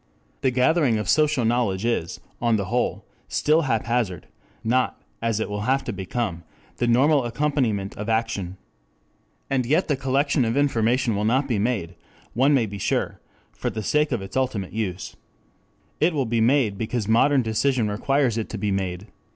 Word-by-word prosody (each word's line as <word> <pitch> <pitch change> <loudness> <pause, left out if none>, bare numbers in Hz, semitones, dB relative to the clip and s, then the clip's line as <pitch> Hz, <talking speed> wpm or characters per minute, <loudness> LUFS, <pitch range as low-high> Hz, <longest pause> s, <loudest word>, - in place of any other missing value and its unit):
The - - +3
gathering 130 0 +2
of 105 -3 -3
social 150 -5 +3
knowledge 115 -4 0
is, 115 -8 -1 0.2
on 115 -1 +3
the 100 -2 -1
whole, 125 - -1 0.2
still 155 +2 +2
haphazard; 115 -5 -1 0.4
not, 125 +3 +1 0.2
as 115 -2 0
it 110 - -1
will 105 0 -4
have 135 +1 +2
to 120 - -4
become, 95 -1 -3 0.4
the 120 - 0
normal 135 +4 +4
accompaniment 120 -6 -1
of 105 +2 -4
action. 110 -5 -1 0.9
And 135 -2 +1
yet 155 +10 +1
the 145 - +3
collection 135 +1 +1
of 115 +3 0
information 125 -4 +2
will 105 - -1
not 130 +6 +2
be 115 -6 0
made, 100 -6 -1 0.4
one 135 +4 +4
may 125 -4 +2
be 100 -1 -7
sure, - - -1 0.3
for - - -3
the 110 - -5
sake 150 +4 +1
of 120 -6 -1
its 95 - -9
ultimate 125 -8 -1
use. 95 -5 -4 0.8
It 160 +1 +2
will 135 -3 +1
be 115 0 0
made 115 -4 +2
because 110 -1 -2
modern 130 +4 +4
decision 115 +1 +1
requires 120 +3 +1
it 110 - -4
to 110 - -5
be 105 0 -1
made. 95 -1 -2
115 Hz, 175 wpm, -24 LUFS, 105-135 Hz, 0.9 s, normal